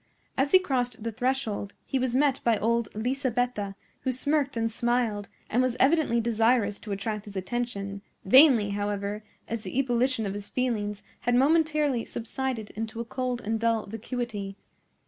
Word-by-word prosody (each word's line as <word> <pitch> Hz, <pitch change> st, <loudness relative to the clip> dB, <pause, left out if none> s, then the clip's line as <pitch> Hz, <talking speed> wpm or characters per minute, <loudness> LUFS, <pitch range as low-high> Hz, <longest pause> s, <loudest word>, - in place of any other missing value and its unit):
As 270 Hz, +1 st, +1 dB
he -, -, +9 dB
crossed 250 Hz, -10 st, -1 dB
the 230 Hz, -, -2 dB
threshold 235 Hz, -4 st, -2 dB
he 270 Hz, -, -1 dB
was 250 Hz, -1 st, 0 dB
met 275 Hz, -1 st, +3 dB
by 230 Hz, -2 st, +3 dB
old 235 Hz, +1 st, +1 dB
Lisabetta, 245 Hz, -4 st, -1 dB, 0.2 s
who 260 Hz, -, -1 dB
smirked 280 Hz, 0 st, +1 dB
and 225 Hz, 0 st, 0 dB
smiled, 230 Hz, -3 st, 0 dB, 0.2 s
and 245 Hz, -, +2 dB
was 255 Hz, -1 st, 0 dB
evidently 280 Hz, -4 st, +3 dB
desirous 225 Hz, -2 st, +2 dB
to 210 Hz, -, -8 dB
attract 210 Hz, +1 st, -3 dB
his 205 Hz, -1 st, -10 dB
attention; 200 Hz, -1 st, -3 dB, 0.2 s
vainly, 240 Hz, -2 st, +7 dB
however, 205 Hz, +1 st, -2 dB, 0.2 s
as 230 Hz, -1 st, -3 dB
the 235 Hz, -, -6 dB
ebullition 255 Hz, -2 st, +1 dB
of 195 Hz, -, -2 dB
his 205 Hz, 0 st, -5 dB
feelings 210 Hz, -5 st, -1 dB, 0.2 s
had 245 Hz, 0 st, +1 dB
momentarily 300 Hz, -2 st, +3 dB
subsided 235 Hz, -1 st, -4 dB
into 225 Hz, +1 st, -5 dB
a 235 Hz, -, -3 dB
cold 250 Hz, 0 st, -2 dB
and 220 Hz, +1 st, -1 dB
dull 230 Hz, -1 st, +1 dB
vacuity. 220 Hz, -2 st, -4 dB
235 Hz, 160 wpm, -27 LUFS, 210-255 Hz, 0.2 s, he